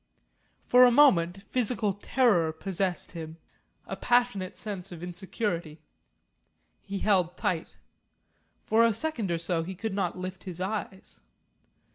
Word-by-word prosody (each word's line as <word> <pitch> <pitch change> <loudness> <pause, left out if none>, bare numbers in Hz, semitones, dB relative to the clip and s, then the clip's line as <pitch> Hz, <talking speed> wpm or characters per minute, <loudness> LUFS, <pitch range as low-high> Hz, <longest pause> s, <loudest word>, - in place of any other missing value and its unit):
For 250 +1 +6
a 250 - +8
moment 195 -9 +4
physical 225 -2 0
terror 205 -5 +2
possessed 185 +2 -2
him, 160 -1 -8 0.5
a - - -5
passionate 240 -7 +1
sense 195 -3 -5
of 175 -1 -9
insecurity. 175 -3 -4 1.0
He 200 0 -5
held 185 -4 +1
tight. 165 -3 -2 0.9
For 225 +1 +4
a 230 -1 +4
second 250 - -1
or 170 - 0
so 170 0 -1
he 185 +3 -6
could 220 +2 -4
not 185 -3 -1
lift 185 0 -7
his 180 -2 -7
eyes. 190 - -5
190 Hz, 130 wpm, -28 LUFS, 175-220 Hz, 1.0 s, a